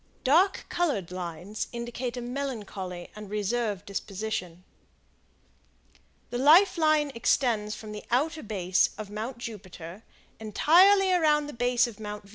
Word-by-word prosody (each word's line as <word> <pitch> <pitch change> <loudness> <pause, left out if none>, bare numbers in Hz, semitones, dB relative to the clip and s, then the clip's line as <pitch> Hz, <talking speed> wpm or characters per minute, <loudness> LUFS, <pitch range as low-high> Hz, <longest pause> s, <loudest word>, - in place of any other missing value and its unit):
Dark 340 +9 +3
colored 280 - -1
lines 180 +3 -5
indicate 240 +1 -5
a - - -3
melancholy 215 -9 -5
and 210 -1 -9
reserved 210 -1 -2
disposition. 195 -3 -5 1.7
The 245 - -2
Life 335 +8 +6
Line 310 -2 +3
extends 225 -3 +1
from 215 -1 -9
the 210 0 -7
outer 310 +6 0
base 190 -5 +1
of 210 -2 -7
Mount 225 +4 -5
Jupiter, 190 -5 -9 0.4
entirely 370 - +5
around 305 -4 +3
the 295 - -8
base 245 +1 +2
of 230 -4 -8
Mount 210 -1 -6
Venus. 200 - -18
225 Hz, 130 wpm, -27 LUFS, 205-280 Hz, 1.7 s, Life